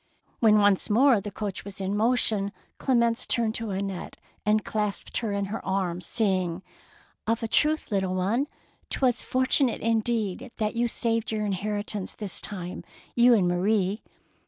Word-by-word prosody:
When 215 -2 +5
once 205 -1 +3
more 235 0 +5
the 205 - -5
coach 200 -1 -5
was 200 0 -7
in 195 +1 -2
motion, 215 -3 +2 0.3
Clemence 235 -3 +2
turned 230 -3 +1
to 230 -1 -4
Annette 195 -1 -4 0.3
and 210 0 +2
clasped 210 -2 -2
her 225 -4 -2
in 200 0 -1
her 225 - -4
arms, 180 -3 -2
saying, 190 -5 +1 0.2
— - - -28
" - - -38
Of 230 +1 0
a - - 0
truth, 305 +3 +2
little 190 -2 0
one, 215 +10 0 0.4
'twas 250 -3 +2
fortu 260 +2 +2
nate 245 - -2
indeed 225 0 -1
that 215 0 -1
you 240 +1 +1
saved 230 -1 0
your 215 -1 -1
in 205 - -1
heritance 205 0 -3
this 205 -3 -2
time, 180 -3 -6 0.2
— - - -28
you 240 0 +6
and 190 -5 +2
Marie." 195 +3 +1
210 Hz, 175 wpm, -26 LUFS, 195-230 Hz, 0.4 s, you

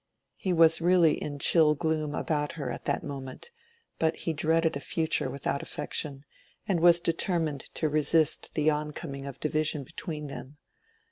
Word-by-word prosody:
He 190 - -2
was 165 -1 +5
really 175 -2 +5
in 145 -1 -4
chill 150 +1 +4
gloom 155 -1 -1
about 150 -2 -1
her 140 -6 -4
at - - -7
that - - 0
moment, 135 - -7 0.5
but 160 0 +2
he 165 - -3
dreaded 160 +1 +1
a - - -2
future 160 -2 -1
without 140 +1 -2
affection, 140 -2 -3 0.4
and 185 -4 +1
was 170 0 +6
determined 165 -3 -1
to 155 - +1
resist 155 +1 +1
the 155 0 +3
oncoming 150 -2 -5
of 140 - -8
division 155 -1 0
between 150 +3 -6
them. 140 0 -8
155 Hz, 155 wpm, -28 LUFS, 145-165 Hz, 0.5 s, was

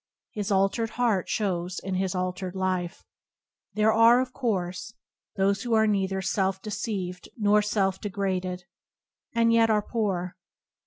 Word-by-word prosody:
His 205 -1 -3
altered 195 +4 +2
heart 225 -7 +1
shows 180 -4 -1
in 190 - -4
his 190 0 -1
altered 185 0 -3
life. 185 -2 -2 0.7
There 215 +1 +3
are, 230 +2 +6
of 255 0 -2
course, 185 -4 -3 0.4
those 195 0 +1
who 240 -2 0
are 220 0 +4
nei 200 -3 +1
ther 190 0 -3
self 190 0 0
deceived 200 -3 -4
nor 210 -1 +4
self 200 -2 0
degraded, 185 -2 -2 0.7
and 230 0 +4
yet 230 -1 +4
are 210 -1 +2
poor. 190 -7 -2
195 Hz, 145 wpm, -26 LUFS, 185-220 Hz, 0.7 s, are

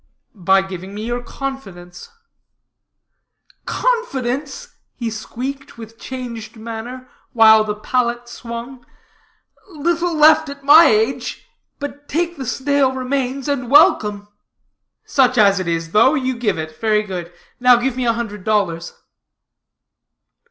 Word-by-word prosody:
"By 190 -1 +2
giving 190 +1 -8
me 215 +1 -5
your 240 +1 -3
confidence." 245 - -8 1.6
"Confidence!" 305 - -2 0.3
he 230 -2 -4
squeaked, 265 +6 -7
with 225 0 -12
changed 235 -4 -7
manner, 230 +3 -8 0.3
while 220 -1 +6
the 210 -1 -3
pallet 240 +2 -1
swung, 240 +2 -8 0.9
"little 340 +1 -1
left 310 0 +5
at 280 0 -10
my 305 +4 +8
age, 235 +1 0 0.3
but 285 0 -8
take 345 +2 -1
the 265 -5 -7
stale 275 0 +1
remains, 260 +1 -3
and 265 -4 -2
welcome." 210 -8 +4 0.8
"Such 255 -3 +2
as 200 -2 +4
it 185 - -4
is, 165 -1 -2
though, 260 - +4
you 260 -3 -1
give 230 -6 -1
it. 155 0 -6
Very 215 -1 +2
good. 180 -4 -6 0.3
Now 250 0 +6
give 245 +1 -1
me 255 -1 -2
a 230 - +3
hundred 210 -4 -5
dollars." 185 -6 -1
245 Hz, 125 wpm, -19 LUFS, 215-275 Hz, 1.6 s, my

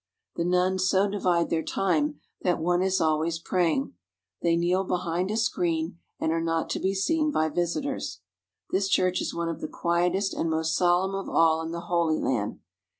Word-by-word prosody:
The 170 - -1
nuns 185 +1 +2
so 195 +1 +3
divide 180 -4 0
their 165 - +1
time 155 -5 0 0.2
that 180 -1 +1
one 175 +2 +1
is 190 0 +1
always 160 0 +1
praying. 165 -4 0 0.5
They 170 -1 +3
kneel 175 +3 +1
behind 180 0 -1
a 215 - -1
screen 170 -6 -1 0.2
and 160 - 0
are 165 0 0
not 165 0 -1
to - - -1
be 190 +1 0
seen 305 +10 +1
by 160 - +1
visitors. 175 - -2 0.5
This 195 +1 +1
church 185 -1 +2
is - - -3
one 170 0 -2
of 165 - -4
the 155 - -3
quietest 180 +4 0
and 165 - -1
most 160 +1 0
solemn 180 +2 +2
of 195 0 -4
all 160 -1 +3
in 160 - -4
the 170 0 -4
Holy 170 -2 +1
Land. 105 -6 -1
175 Hz, 185 wpm, -27 LUFS, 165-190 Hz, 0.5 s, so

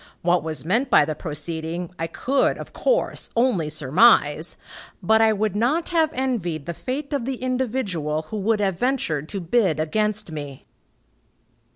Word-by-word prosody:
What 175 +1 +3
was 155 -1 -5
meant 230 +10 +1
by 150 - +6
the 155 - -2
proceeding, 160 +2 -4
I 165 - -1
could, 265 +11 +1
of - - -9
course, - - 0
only 225 -11 +2
surmise, 155 - +3 0.5
but 220 +5 +4
I 220 0 +5
would 215 -1 -1
not 265 +10 +1
have 320 -3 +2
envied 200 - -2
the 170 - -4
fate 275 - -5
of 275 -5 -1
the 265 0 -2
individual 225 - -2
who 215 +7 -6
would 210 +2 +1
have 190 -3 0
ventured 170 - -1
to 200 - -3
bid 180 -2 +1
against 210 +4 -1
me." 145 -3 -7
195 Hz, 160 wpm, -23 LUFS, 160-245 Hz, 0.5 s, by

